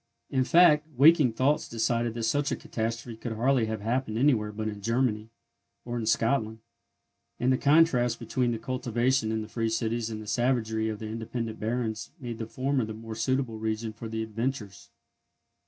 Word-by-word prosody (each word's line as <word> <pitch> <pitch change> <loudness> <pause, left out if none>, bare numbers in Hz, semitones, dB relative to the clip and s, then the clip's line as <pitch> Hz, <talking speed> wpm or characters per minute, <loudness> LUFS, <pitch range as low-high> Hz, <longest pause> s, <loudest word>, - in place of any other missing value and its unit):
In 130 -1 +2
fact, 155 -1 +5
waking 145 -3 +6
thoughts 135 +6 +1
decided 115 0 0
that 115 - -3
such 145 +5 +1
a - - +1
catastrophe 115 +1 -4
could 115 +1 -5
hardly 120 +1 +2
have 110 -1 -3
happened 115 0 -1
anywhere 115 -5 +2
but 110 +1 -4
in 105 -1 -5
Germany, 115 -1 0 0.6
or 120 0 -4
in 115 -2 -3
Scotland; 115 0 +1 0.8
and 130 +1 +3
the - - +2
contrast 140 -6 +4
between 125 -2 -1
the 115 - -2
cultivation 125 -1 0
in 110 0 -1
the - - -8
free 115 0 -2
cities 115 0 -1
and 110 -1 -5
the 110 - -8
savagery 110 -1 0
of 110 - -4
the 110 - -6
independent 110 0 -4
barons 115 0 -2
made 120 -4 -6
the 110 - -4
former 130 +2 -1
the 110 0 -5
more 115 0 -8
suitable 115 0 -1
region 110 0 -2
for 110 +1 -8
the 110 0 -2
adventures. 110 - -4
115 Hz, 180 wpm, -28 LUFS, 110-130 Hz, 0.8 s, waking